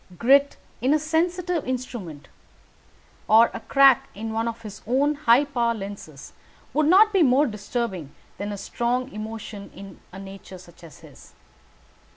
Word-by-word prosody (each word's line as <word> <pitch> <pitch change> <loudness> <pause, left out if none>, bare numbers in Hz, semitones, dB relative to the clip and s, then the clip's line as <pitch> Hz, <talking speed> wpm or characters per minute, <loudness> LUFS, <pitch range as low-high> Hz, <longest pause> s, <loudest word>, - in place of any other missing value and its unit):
Grit 275 +6 +3 0.2
in 265 +5 +3
a - - +4
sensitive 340 +2 -1
instrument, 225 - -6 1.0
or 225 +2 +5
a - - -5
crack 275 +2 +4
in 220 +2 -5
one 225 +1 -1
of 230 0 -6
his 210 -2 -9
own 275 +5 +2
high 280 -2 +3
power 235 -4 -1
lenses, 195 -8 -9 0.4
would 305 0 +2
not 420 +5 +5
be 385 - +3
more 275 0 +4
disturbing 210 - -4 0.3
than 205 +1 -4
a 205 - -5
strong 245 +5 -2
emotion 215 -1 -8
in 195 -2 -11
a 190 - -10
nature 195 -1 -10
such 175 -1 -17
as 165 - -14
his. - - -16
235 Hz, 155 wpm, -24 LUFS, 200-280 Hz, 1.0 s, or